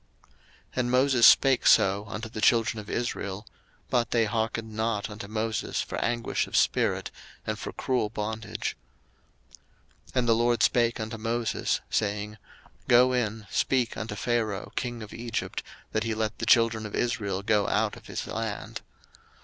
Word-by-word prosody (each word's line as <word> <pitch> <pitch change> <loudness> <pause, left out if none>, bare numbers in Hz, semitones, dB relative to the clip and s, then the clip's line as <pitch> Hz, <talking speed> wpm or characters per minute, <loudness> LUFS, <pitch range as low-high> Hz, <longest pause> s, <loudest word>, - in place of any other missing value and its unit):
02:006:009 - - -33 0.4
And 125 -1 +1
Moses 130 -2 +6
spake 135 -2 +5
so 100 -1 +5
unto 105 +3 -5
the 110 -1 -7
children 115 -1 +3
of 105 - -9
Israel: 105 -4 -3 0.5
but 120 -1 +2
they 115 -2 +2
hearkened 110 0 -2
not 110 -1 -1
unto 105 -1 -7
Moses 110 +1 -2
for - - -5
anguish 120 0 -1
of - - -1
spirit, - - +1 0.3
and - - -3
for - - -5
cruel 125 -5 -1
bondage. 110 +1 -4 1.3
02:006:010 - - -17
And 125 -2 +2
the 115 - +5
LORD 120 +1 +2
spake 120 -1 +3
unto 110 0 -4
Moses, 115 +1 -1
saying, 105 0 -1
02:006:011 105 - -15 0.5
Go 125 +1 +6
in, 110 -3 -1
speak 125 -3 +1
unto 110 -1 -5
Pharaoh 110 -3 -1
king 120 -2 -3
of 105 - -10
Egypt, 115 -1 -3 0.3
that 110 - 0
he 115 -1 -1
let 110 -1 -2
the - - -3
children 115 -2 +4
of 105 - -7
Israel 105 -5 -1
go 105 -1 +2
out 105 0 +1
of - - -14
his - - -4
land. - - -4
115 Hz, 165 wpm, -27 LUFS, 105-120 Hz, 1.3 s, Moses